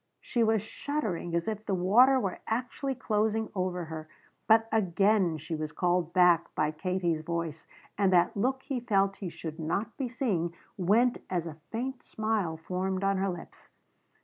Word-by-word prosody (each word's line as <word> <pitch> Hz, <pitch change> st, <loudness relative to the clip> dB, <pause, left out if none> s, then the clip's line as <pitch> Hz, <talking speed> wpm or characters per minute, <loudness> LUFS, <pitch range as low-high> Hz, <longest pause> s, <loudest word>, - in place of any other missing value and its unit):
She 235 Hz, -, 0 dB
was 220 Hz, -2 st, +2 dB
shuddering 215 Hz, -, -3 dB
as 170 Hz, 0 st, 0 dB
if 215 Hz, -1 st, -3 dB
the 200 Hz, -, -1 dB
water 240 Hz, +9 st, +5 dB
were 195 Hz, -6 st, -2 dB
actually 255 Hz, +4 st, -2 dB
closing 220 Hz, -2 st, 0 dB
over 180 Hz, -2 st, -2 dB
her. 155 Hz, -1 st, -7 dB, 0.4 s
But 225 Hz, 0 st, +5 dB
again 195 Hz, -3 st, +2 dB
she 160 Hz, +3 st, -6 dB
was 155 Hz, -1 st, -3 dB
called 175 Hz, -1 st, +1 dB
back 175 Hz, -2 st, +4 dB
by 155 Hz, -, +1 dB
Katie's 175 Hz, 0 st, -1 dB
voice 165 Hz, -1 st, -4 dB, 0.3 s
and 195 Hz, -2 st, +4 dB
that 180 Hz, +5 st, +4 dB
look 260 Hz, +6 st, 0 dB
he 270 Hz, -3 st, -2 dB
felt 195 Hz, -4 st, +1 dB
he 190 Hz, -, -4 dB
should 160 Hz, -1 st, -7 dB
not 200 Hz, +8 st, -2 dB
be 265 Hz, -3 st, -2 dB
seeing 190 Hz, -10 st, -1 dB, 0.2 s
went 225 Hz, +7 st, +3 dB
as 175 Hz, -3 st, -1 dB
a 160 Hz, -1 st, -8 dB
faint 250 Hz, +3 st, -3 dB
smile 215 Hz, -7 st, -1 dB
formed 185 Hz, +3 st, -2 dB
on 195 Hz, 0 st, +2 dB
her 195 Hz, +1 st, 0 dB
lips. 175 Hz, -2 st, -9 dB
190 Hz, 170 wpm, -29 LUFS, 170-220 Hz, 0.4 s, water